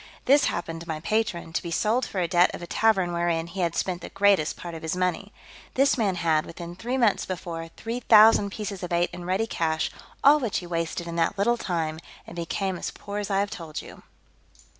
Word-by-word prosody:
This 280 +2 +5
happened 165 -1 -3
to 170 - -10
my 155 -1 -3
patron, 175 -3 -1
to - - 0
be 170 - -6
sold 220 +9 +1
for 190 - -2
a 175 - +1
debt 175 0 +4
of - - -9
a - - -4
tavern 190 -3 +2
wherein 170 -1 0
he 170 +3 -8
had 170 -2 0
spent 180 -2 -1
the - - -7
greatest 195 -6 +2
part 175 -1 -7
of 165 - -7
his 160 +2 -2
money. 185 +2 -1 0.4
This 275 +1 +4
man 205 -6 +1
had, 160 -3 +2
within 170 +1 -8
three 245 +7 -3
months 230 -6 +3
before, 170 -3 -5
three 230 +2 -4
thousand 220 -3 +6
pieces 200 -1 -5
of 180 -1 -5
eight 175 0 +1
in 175 0 -7
ready 190 +5 +1
cash, 160 -6 -1 0.3
all 290 +2 +7
which 235 -7 -1
he 180 - -4
wasted 170 0 -3
in 170 0 -5
that 170 +4 +1
little 230 +5 +3
time, 165 -7 -2 0.3
and - - -11
became 180 +2 -2
as - - -3
poor 205 0 -6
as 205 -1 -4
I 195 0 +2
have 200 - -2
told 160 -3 -6
you. - - -12
180 Hz, 225 wpm, -26 LUFS, 170-205 Hz, 0.4 s, all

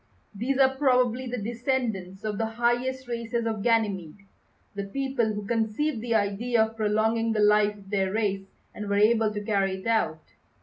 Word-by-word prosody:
These 245 +6 -1
are 265 -1 +4
probably 255 -2 +2
the 250 +1 -3
descendants 225 -4 -2
of 210 -2 -3
the 225 - 0
highest 240 +3 -1
races 235 -1 -2
of 220 -2 -2
Ganymede; 200 -5 0 0.5
the 200 -1 -4
people 265 0 -1
who 210 -1 -5
conceived 230 +4 -1
the 230 -1 -1
idea 220 +3 +2
of 220 0 -10
prolonging 220 +1 +1
the 215 - -1
life 210 0 +4
of 195 -1 -15
their 190 -2 +1
race 200 -2 -1 0.3
and 210 -1 -6
were 200 - +1
able 220 +1 +4
to 210 - -4
carry 195 -2 0
it 190 - -10
out. 190 -9 -1
220 Hz, 175 wpm, -26 LUFS, 205-240 Hz, 0.5 s, are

